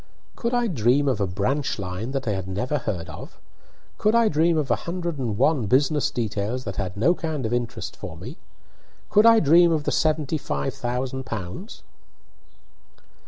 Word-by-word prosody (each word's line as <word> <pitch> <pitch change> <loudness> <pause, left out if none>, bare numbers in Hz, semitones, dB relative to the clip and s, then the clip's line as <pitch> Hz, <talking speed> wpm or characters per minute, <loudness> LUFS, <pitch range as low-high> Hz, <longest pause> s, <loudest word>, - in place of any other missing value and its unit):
"Could 235 +1 -1
I 245 0 +2
dream 140 - +2
of 125 -6 +1
a 100 - +1
branch 125 +10 -1
line 95 +3 -4
that 135 -2 -3
I - - +2
had 95 -2 -3
never 125 +10 -1
heard 90 -8 -4
of? 80 - -10 0.6
Could 215 +2 +3
I 230 -2 +5
dream 160 +2 +2
of 145 -5 0
a - - +5
hundred 170 -4 -3
and 115 -6 -2
one 135 -3 +2
business 140 +5 +2
details 110 +2 -2
that 100 -5 -6
had 95 -1 -3
no 135 +12 +4
kind 160 -7 -3
of 110 - -1
interest 120 -1 -3
for - - -8
me? - - -9 0.7
Could 210 +2 +6
I 230 -1 +7
dream 170 +2 +5
of 155 -2 +1
the - - -1
seventy 155 -1 +1
five 70 - -2
thousand 130 +2 -3
pounds?" 105 - -6
130 Hz, 180 wpm, -24 LUFS, 105-160 Hz, 0.7 s, I